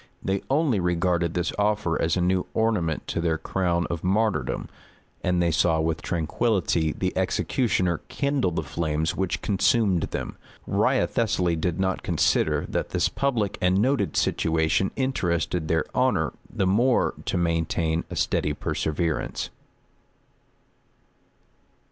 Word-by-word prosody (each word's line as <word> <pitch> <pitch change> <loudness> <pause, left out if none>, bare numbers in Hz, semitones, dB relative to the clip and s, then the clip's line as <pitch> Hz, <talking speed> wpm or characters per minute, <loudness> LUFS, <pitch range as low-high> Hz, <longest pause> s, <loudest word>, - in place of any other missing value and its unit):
They 95 0 0
only 135 -6 +2
regarded 85 -1 0
this 90 0 -1
offer 105 -5 +1
as 85 +2 +1
a - - +1
new 90 +1 +1
ornament 105 -9 0
to 85 - -1
their 80 -1 +1
crown 85 +1 0
of 85 -2 -4
martyrdom; 105 +3 0 0.6
and 90 -1 +2
they 85 - +2
saw 80 0 +2
with 80 -1 -1
tranquillity 85 -1 0
the - - -2
executioner 95 -9 0
kindle 140 -8 0
the 80 -1 -2
flames 80 +1 -1
which 95 -2 -2
consumed 100 -2 +2
them. - - -5 0.3
Wriothesely 95 -7 +1
did 80 +2 -2
not 95 0 0
consider, - - +1
that - - -2
this - - +1
public 120 -8 -1
and 90 +1 +3
noted 130 +5 +1
situation 80 +4 +1
interested 90 - -1
their 80 -1 +1
honor - - +1 0.2
the 95 - 0
more 120 +7 +3
to - - -1
maintain 85 -1 0
a - - -6
steady 75 - 0
perseverance. 80 +2 -2
90 Hz, 130 wpm, -25 LUFS, 80-105 Hz, 0.6 s, and